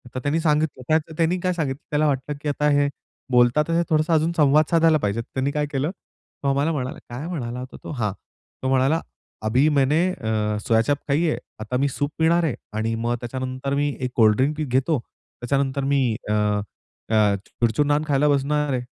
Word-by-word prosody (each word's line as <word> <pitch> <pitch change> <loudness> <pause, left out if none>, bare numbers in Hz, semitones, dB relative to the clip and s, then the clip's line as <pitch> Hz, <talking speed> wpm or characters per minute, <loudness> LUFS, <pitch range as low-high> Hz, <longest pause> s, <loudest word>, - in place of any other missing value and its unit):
तर - - -1
त्यांनी 145 +5 0
सांगितलं 150 -4 0
क्य 155 - +5
त्य - - -11
त्यांनी 170 +2 +1
काय 180 0 0
सांगितलं 145 -4 -3
त्याला 150 +1 +2
वाटलं 140 +1 -1
की 150 - -2
आता 150 +1 0
हे 145 -1 +3 0.4
बोलता 125 +4 +4
तर 165 - -1
हे 170 +1 +3
थोडासा 155 +1 +2
अजून 160 +1 +2
संवाद 150 +1 +5
साधायला 165 -1 +5
पाहिजे. 105 +1 -1
त्यांनी 130 +3 -2
काय 150 0 0
केलं, 140 +4 -1
तो 145 - -12
आम्हाला 140 +4 +1
म्हणाला, 130 -4 -3
काय 130 +7 -6
म्हणाला 125 -8 -4
होता 130 +1 -8
तो? - - -6
हां. 110 -8 -1 0.5
तो - - 0
म्हणाला, 135 +5 +3 0.5
"अभी 125 +7 +3
मैंने 145 +4 +3
अ, 110 -5 -1
सोया-चाप 115 +6 +3
खाई 145 +4 +2
है, 160 - +1 0.2
आता 120 +4 -2
मी 140 - +2
सूप 145 +2 -2
पिणार 170 +2 +3
आहे 150 -7 0 0.2
आणि 115 +1 0
मग 120 +1 -1
त्याच्यानंतर 130 +2 -4
मी 145 +1 +1
एक 125 -1 -2
कोल्ड 110 -2 +5
ड्रिंक 140 +4 +1
पि 155 - -1
घेतो, 130 +3 +1 0.4
त्याच्यानंतर 135 +2 0
मी 140 0 +2 0.3
अ, 105 - +2
अ, 105 0 0
चुरचुर-नान 145 +6 +1
खायला 145 0 +3
बसणार 145 +1 +1
आहे." 125 - 0
140 Hz, 195 wpm, -23 LUFS, 125-150 Hz, 0.5 s, क्य